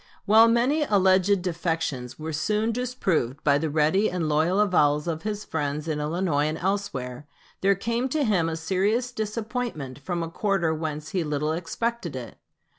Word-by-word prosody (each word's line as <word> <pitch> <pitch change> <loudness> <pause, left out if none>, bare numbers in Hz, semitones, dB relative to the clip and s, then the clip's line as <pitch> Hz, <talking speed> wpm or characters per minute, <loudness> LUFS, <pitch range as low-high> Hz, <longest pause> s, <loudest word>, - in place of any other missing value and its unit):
While 220 +2 +7
many 245 +7 +2
alleged 190 -5 +3
defections 160 -8 -2
were 160 +1 -5
soon 210 +8 0
disproved 195 - -1
by 145 -1 +4
the 160 +1 -1
ready 160 +8 +2
and 175 -3 -2
loyal 160 +6 +2
avowals 150 -7 +3
of 160 -1 -2
his 210 -1 -4
friends 150 -1 -3
in 155 -2 -1
Illinois 150 -1 0
and 155 - -2
elsewhere, 145 -9 -3 0.3
there 195 +1 +4
came 235 +6 -1
to 300 +2 0
him 185 -9 +2
a 160 - -3
serious 195 +9 0
disappointment 215 - -4
from 170 +3 -3
a 165 - -4
quarter 195 -5 0
whence 155 -1 -4
he 185 -3 -1
little 150 0 -1
expected 180 - -3
it. 125 -2 -7
175 Hz, 165 wpm, -25 LUFS, 150-210 Hz, 0.3 s, While